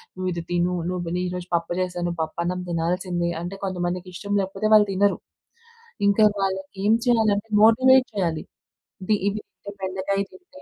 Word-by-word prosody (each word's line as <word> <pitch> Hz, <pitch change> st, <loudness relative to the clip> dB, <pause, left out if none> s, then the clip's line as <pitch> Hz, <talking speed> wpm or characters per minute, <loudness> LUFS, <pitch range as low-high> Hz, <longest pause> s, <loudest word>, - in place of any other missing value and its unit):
"నువ్విది 185 Hz, -2 st, -2 dB
తిను, 175 Hz, +1 st, +1 dB, 0.2 s
నువ్వు 175 Hz, -2 st, -3 dB
నే 180 Hz, -, 0 dB
ఈరోజు 180 Hz, 0 st, -5 dB
పప్పు 170 Hz, +1 st, -1 dB
జేశాను, 175 Hz, -1 st, -2 dB
పప్పున్నం 170 Hz, +3 st, -2 dB
తినాల్సిందే." 175 Hz, +1 st, -1 dB
అంటే 175 Hz, +3 st, -5 dB
కొంతమందికి 180 Hz, -1 st, -3 dB
ఇష్టం 200 Hz, +3 st, -5 dB
లేకపోతే 195 Hz, +3 st, -2 dB
వాళ్ళు 210 Hz, -1 st, +7 dB
తినరు. 200 Hz, +1 st, +2 dB, 0.9 s
ఇంక 200 Hz, -, +3 dB, 0.2 s
వాళ్ళకేం 190 Hz, +2 st, 0 dB
చేయాలంటే 220 Hz, -3 st, +2 dB
మోటివేట్ 260 Hz, +3 st, +6 dB
చేయాలి. 165 Hz, -5 st, -1 dB, 0.6 s
ఇది 210 Hz, +3 st, +2 dB
ఇవి 210 Hz, +1 st, -4 dB
అంటే, 200 Hz, -, -11 dB
బెండకాయ 190 Hz, +1 st, -1 dB
తింటే 325 Hz, -7 st, -16 dB
185 Hz, 140 wpm, -24 LUFS, 175-205 Hz, 0.9 s, వాళ్ళు